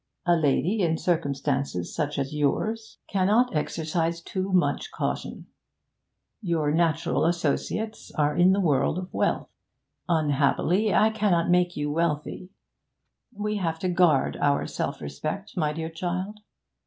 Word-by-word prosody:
A 175 -1 +4
lady 165 +7 +1
in 165 -2 +1
circumstances 140 - -1
such 150 -2 -2
as 140 +1 -2
yours 220 +10 -1
cannot 205 +4 +2
exercise 165 +2 -1
too 190 +3 -4
much 185 -1 +1
caution. - - -4 1.0
Your 165 -6 0
natural 165 0 +1
associates 175 +6 -2
are 150 -1 +2
in 180 +2 +5
the 195 - +2
world 155 -3 +2
of 185 0 -6
wealth; - - 0 0.6
unhappily, 160 +6 +2
I 220 +2 +4
cannot 190 -6 +1
make 180 0 +2
you 145 0 -1
wealthy. 165 +2 -2 0.8
We 210 -1 -3
have 165 -4 -1
to 185 +2 -2
guard 175 -6 +3
our 145 -1 +1
self - - -4
respect, 155 - -5
my 155 -5 +1
dear 160 +1 -5
child. 185 +5 -4
170 Hz, 130 wpm, -26 LUFS, 150-185 Hz, 1.0 s, in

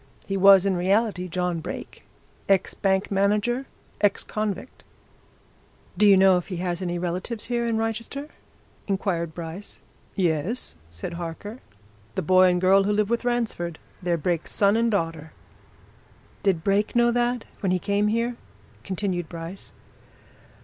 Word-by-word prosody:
"He 195 - -3
was 195 0 +7
in 195 -1 +2
reality 190 +1 +1
John 180 -1 -1
Brake, - - -7 0.5
ex 195 -1 +3
bank 195 0 0
manager, 210 +6 +1 0.3
ex 205 -1 +2
convict." 210 +1 -4 1.1
"Do 205 +3 +4
you 200 -1 +7
know 190 -1 +6
if 180 - -4
he's 180 -1 -3
any 175 -1 -2
relatives 180 +6 -3
here 235 -1 -1
in 230 -1 0
Wrychester?" 230 +6 -3 0.6
inquired 175 -5 -1
Bryce. 170 +4 -8 0.4
"Yes," 175 - 0
said 85 - -6
Harker. 175 +7 -6 0.6
"The 190 - -1
boy 185 +3 +6
and 180 0 +1
girl 195 +2 +4
who 205 - +1
live 210 +1 +1
with 235 +1 0
Ransford 225 -9 -1 0.2
they're 175 -2 0
Brake's 170 +1 -1
son 200 0 +3
and 230 +1 +2
daughter." 165 -6 -2 1.1
"Did 185 -5 +1
Brake 200 +4 +1
know 240 0 +4
that 240 0 0
when 195 -3 0
he 185 - +3
came 200 +3 0
here?" 230 +2 0 0.5
continued 185 -2 -2
Bryce. 170 +3 -8
195 Hz, 145 wpm, -25 LUFS, 175-215 Hz, 1.1 s, was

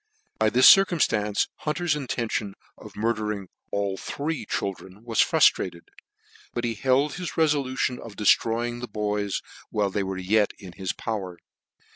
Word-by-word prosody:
By 110 0 +4
this 125 +4 +6
circumftance 115 - +4
Hunter's 155 +1 -1
intention 115 -7 -3 0.2
of - - -13
mur 115 +2 +1
dering 105 -4 -4 0.2
all 100 -1 -1
the - - -10
three 145 -5 -4
children 100 +1 -4
was 115 -2 -3
fruftrated; 85 -2 +3 0.7
but 120 - -2
he 120 -1 0
held 135 +6 +1
his 180 -1 -5
relblution 140 -5 +1
of 110 -3 -10
deftroying 120 +3 +2
the 125 - -4
boys 105 -2 -2 0.3
while 100 -2 0
they 100 - -1
were 95 -1 -3
yet 100 +3 +2
in 95 -3 -10
his 95 +1 -3
power. 95 -6 -5
110 Hz, 150 wpm, -25 LUFS, 100-130 Hz, 0.7 s, this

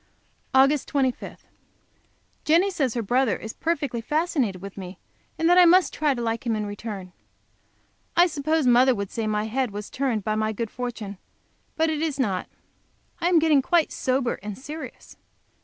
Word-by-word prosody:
Aug. 275 +2 +5
25. 265 -3 -2 1.0
Jenny 345 +6 +3
says 275 -10 -1
her 235 - -1
brother 245 0 +1
is 220 - -7
perfectly 285 -8 -2
fascinated 275 - 0
with 195 +1 -9
me, 185 -1 -8 0.4
and 325 - +1
that 355 +1 +6
I 360 - +8
must 360 +2 +5
try 295 -3 +1
to 240 - -4
like 230 0 -2
him 230 -2 0
in 210 -1 -2
return. 205 -3 -6 1.1
I 350 - +7
suppose 310 -2 0
mother 250 +1 +5
would 200 -2 -4
say 225 -1 -2
my 210 0 0
head 245 +3 -1
was 205 +1 -7
turned 250 -6 -1
by 215 - -1
my 215 0 0
good 225 0 -4
fortune, 225 -6 -6 0.6
but 320 0 +2
it 310 -1 -2
is 315 -4 -1
not. 195 -8 -1 0.7
I 340 - 0
am 355 - +4
getting 310 -3 +4
quite 330 +4 +2
sober 255 -1 -1
and 210 0 -6
serious. 300 +4 -9
255 Hz, 175 wpm, -25 LUFS, 215-310 Hz, 1.1 s, I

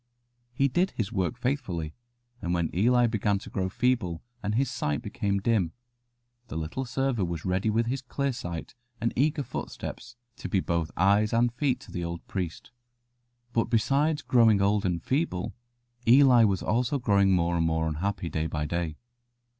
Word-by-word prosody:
He 135 +3 +2
did 175 +8 +1
his 110 -2 -1
work 95 +2 -1
faithfully, 95 - -2 0.5
and 85 +1 -1
when 85 -2 0
Eli 120 +6 +4
began 105 -3 +1
to 95 - -10
grow 95 -1 -1
feeble 100 -8 0 0.2
and 105 +1 -1
his 135 +3 +2
sight 75 -1 -2
became 100 -1 -1
dim, 95 -5 +1 0.7
the 110 - -5
little 80 +12 -3
server 130 -3 0
was 85 -3 -3
ready 95 +3 +1
with 115 +2 +2
his 130 +3 -2
clear 140 +1 -2
sight 85 -7 -6 0.3
and 115 +1 0
eager 145 +2 +1
footsteps 115 -1 -6 0.2
to - - -6
be 95 - +2
both 85 -3 -1
eyes 100 +4 +3
and 120 +1 +3
feet 125 0 0
to - - -13
the 90 - -3
old 85 0 -5
priest. 90 -4 -5 0.8
But 115 - +2
besides 140 +7 +1
growing 115 -5 +5
old 100 0 +2
and 85 -2 -2
feeble, 130 - -1 0.5
Eli 125 -2 +7
was 95 -3 0
also 125 +5 +1
growing 100 -6 +3
more 85 -1 +2
and 85 -1 +2
more 80 0 0
unhappy 85 +4 -2
day 80 -1 -1
by 75 -2 -2
day. 85 -1 -2
105 Hz, 170 wpm, -28 LUFS, 85-125 Hz, 0.8 s, Eli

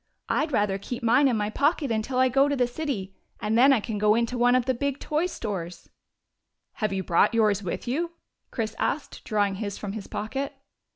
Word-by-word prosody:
" - - -52
I 305 - +1
'd - - -12
rather 205 -5 +1
keep 245 +4 -6
mine 245 +5 +5
in 245 -4 +1
my 210 0 -1
pocket 285 +1 +1
until 225 +4 -1
I 260 0 +5
go 270 +3 +3
to 285 - +1
the 250 -2 +2
city, 240 -8 -4 0.2
and 215 +1 -1
then 260 +4 +7
I 265 - +4
can 210 0 -4
go 210 +1 +4
into 235 +1 0
one 245 +1 +4
of 255 -2 +2
the 260 - +1
big 280 +2 -2
toy 310 +4 0
stores 180 - -6 0.2
— - - -56
" - - -56
" - - -56
Have 215 - +1
you 190 -1 -2
brought 175 +6 +3
yours 210 -3 +3
with 185 +5 -4
you? 335 +7 -1 0.2
" - - -53
Chris 220 -2 -3
asked, 290 - -2
drawing 205 -3 +1
his 200 -2 -3
from 205 - -5
his 205 -1 -7
pocket. 270 +6 -4
235 Hz, 240 wpm, -26 LUFS, 210-270 Hz, 0.2 s, then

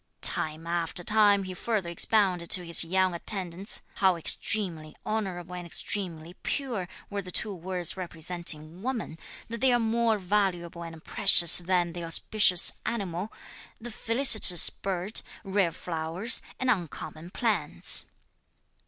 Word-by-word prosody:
Time 155 +1 0
after 170 +1 -3
time, 205 0 +4
he 185 -1 -7
further 200 -2 -3
expounded 180 -2 +1
to 180 - +4
his 170 0 +3
young 185 +2 0
attendants, 185 +1 -2
how 190 -2 +3
extremely 165 -2 -3
honourable 185 -5 -4
and 175 -1 -7
extremely 170 -2 -4
pure 240 -10 -3 0.2
were 200 0 -3
the 185 - -11
two 205 +3 -1
words 180 -1 -4
representing 170 -2 -1
woman, 230 -9 -5 0.3
that 230 +1 -7
they 260 -1 +4
are 245 - +3
more 230 -1 0
valuable 180 -3 -2
and 165 -1 -11
precious 175 -5 +5
than 175 -1 -1
the 175 0 -7
auspicious 180 +2 +4
animal, 195 -3 -4 0.5
the 240 +1 -9
felicitous 225 - +6
bird, 195 +2 -3 0.2
rare 195 -3 0
flowers 165 +8 -3 0.2
and 255 -1 +1
uncommon 165 -4 -5
plants. 220 +2 0
185 Hz, 130 wpm, -27 LUFS, 170-210 Hz, 0.5 s, felicitous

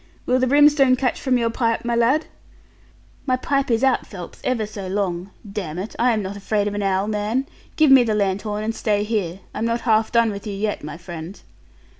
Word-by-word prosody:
Will 255 +1 +2
the 255 - +2
brimstone 285 -1 +5
catch 255 0 -1
from 260 -2 +2
your 230 -1 0
pipe, 230 -1 -1
my 235 0 0
lad?' 250 +7 +2 1.0
'My 255 - +3
pipe 275 +1 -1
is 230 +1 +1
out, 265 -1 +2
Phelps, 180 -4 -10
ever 235 -4 0
so 205 -2 -7
long. 185 -1 -2 0.2
Damn 190 -6 -5
it, 195 +4 -5
I 245 +1 +4
am 215 -3 0
not 190 +1 -5
afraid 205 +1 -1
of 205 - -2
an 205 - -2
owl, 195 0 +1
man. 215 +5 -1 0.3
Give 310 -3 +4
me 265 -2 +8
the 220 -2 0
lanthorn, 205 +1 -1
and 225 +1 -1
stay 205 -2 0
here. 200 -4 -2
I'm 225 - -2
not 230 +1 0
half 220 -2 +2
done 235 -2 +3
with 200 +1 -7
you 205 - -3
yet, 205 -2 -2
my 150 +1 -6
friend.' 170 +2 -8
215 Hz, 215 wpm, -22 LUFS, 200-245 Hz, 1.0 s, me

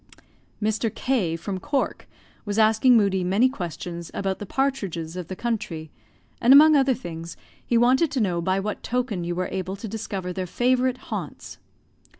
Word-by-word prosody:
Mr. 220 +1 0
K, 205 -12 0
from 185 +3 -4
Cork, 280 +7 -2 0.4
was 205 -1 -3
asking 225 +3 +5
Moodie 195 -3 +2
many 195 +8 +3
questions 170 - -6
about 190 -1 -2
the 205 - -7
partidges 195 -13 -2
of 180 -3 -5
the 185 - -5
country; 195 -9 -4 0.5
and, 240 - +5
among 305 +3 +9
other 270 -2 +3
things, 170 -6 -8 0.3
he 235 - +1
wanted 255 +7 +4
to 270 - -2
know 180 -6 0
by 185 +3 +1
what 210 +1 -4
token 240 -7 -2
you 175 0 -3
were 185 +1 -2
able 190 0 -3
to 205 +3 -7
discover 195 -4 -4
their 185 0 -3
favourite 255 +4 +1 0.2
haunts. - - -6
205 Hz, 165 wpm, -24 LUFS, 180-250 Hz, 0.5 s, among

